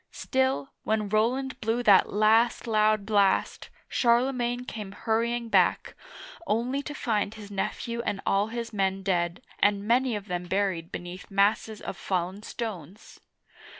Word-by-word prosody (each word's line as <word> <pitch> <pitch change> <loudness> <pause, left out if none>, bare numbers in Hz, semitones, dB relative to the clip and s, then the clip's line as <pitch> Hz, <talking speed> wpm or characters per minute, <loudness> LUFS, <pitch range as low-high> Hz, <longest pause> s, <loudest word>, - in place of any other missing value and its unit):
Still, 265 +1 0
when 215 -1 0
Roland 250 +6 0
blew 225 +2 0
that 200 -4 +5
last 220 +4 +3
loud 215 -2 +2
blast, 200 -2 +1 0.2
Charlemagne 245 0 +1
came 210 -5 -7
hurrying 235 +2 -1
back, - - +2 0.5
only 245 +6 0
to 295 +1 -7
find 215 -4 -1
his 205 -2 -10
nephew 235 +4 -3
and 205 -4 -2
all 200 +2 +2
his 230 0 -5
men 195 -1 0
dead, 175 +1 -1 0.2
and 205 0 +2
many 245 0 +2
of 205 0 -6
them 180 -1 -3
buried 185 -3 -1
beneath 175 +1 -7
masses 205 +2 +1
of - - -6
fallen 185 +1 -2
stones 210 - -7
215 Hz, 140 wpm, -27 LUFS, 195-235 Hz, 0.5 s, that